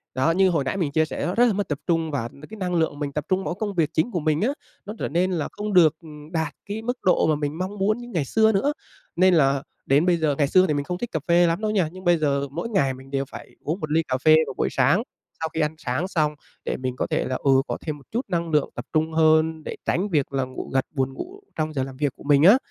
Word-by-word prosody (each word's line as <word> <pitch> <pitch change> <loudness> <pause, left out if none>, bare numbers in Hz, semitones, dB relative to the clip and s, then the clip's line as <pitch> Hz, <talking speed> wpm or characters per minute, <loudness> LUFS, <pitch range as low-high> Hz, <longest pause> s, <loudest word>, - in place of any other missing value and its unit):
đó, 130 +5 +2
như 190 +2 +4
hồi 160 -5 +1
nãy 135 +8 -2
mình 165 -7 -1
chia 160 +2 +2
sẻ - - -4
đó, 175 - -2
rất 240 - +5
là 235 - +3
mất 205 +1 -2
tập 145 -2 -3
trung. 165 -2 +1
Và 130 -5 -2
n 140 - -17
cái 220 - -9
năng 180 -3 -2
lượng 160 -3 0
mình 145 -2 -3
tập 150 0 -3
trung 185 +1 +1
mỗi 175 - -3
công 205 +1 -3
việc 160 -3 +2
chính 160 +11 +1
của 180 - -1
mình 155 0 0
á, 225 - +2 0.4
nó 210 - -6
trở - - -2
nên 180 +4 +1
là 165 -4 -1
không 210 0 -4
được, 165 -5 +6
ừm, 150 -1 -12
đạt 160 -3 -1
cái 210 +2 -4
mức 245 +3 -2
độ 185 - +3
mà 155 - +3
mình 145 +1 -3
mong 190 +3 -4
muốn 210 +3 +2
như 240 0 -9
ngày 160 -5 0
xưa 220 - +3
nữa. 275 +9 +1 0.4
Nên 185 +1 +5
là 140 -4 +3 0.2
đến 140 +5 +3
bây 180 -1 +3
giờ 155 -3 +1
ngày 145 - +2
xưa 185 +5 +4
thì 150 - +1
mình 145 -1 -1
không 180 +4 -4
thích 240 +4 -5
cà 160 - -1
phê 175 0 +5
lắm 165 +4 0
đâu 215 -1 0
nha, 190 -7 +1
nhưng 185 +1 -11
bây 175 -1 +4
giờ, 140 -2 0
mỗi 170 +10 -4
ngày 160 - +1
mình 135 +1 -13
đều 135 0 -1
phải - - -11
uống 160 +6 -2
1 155 -4 -5
ly 165 +1 +3
cà 130 - 0
phê 155 +4 +6
vào 135 - -5
buổi - - +1
sáng, 145 - +3 0.4
sau 160 - -2
khi 160 - -2
ăn 150 +1 0
sáng 135 +5 -2
xong, 155 -5 0 0.3
để - - -2
mình 130 -1 -3
có - - -2
thể - - 0
là, 130 - -2
ừ, 135 - +1 0.2
có - - -2
thêm 155 -2 -4
một 140 - -17
chút 235 - 0
năng 170 -2 -1
lượng 150 -2 +2
tập - - -6
trung 160 0 +1
hơn, 160 0 +3
để - - -5
tránh 195 +5 0
việc 145 -6 0
là 135 -1 +1
ngủ 130 0 -7
gật, 135 -1 +2
buồn 135 -3 -1
ngủ 370 - -8 0.2
trong 155 0 -2
giờ 135 -3 -1
làm 130 -1 -8
việc 145 -2 0
của - - -15
mình 145 0 +4
á. 200 +8 +8
160 Hz, 300 wpm, -24 LUFS, 145-185 Hz, 0.4 s, á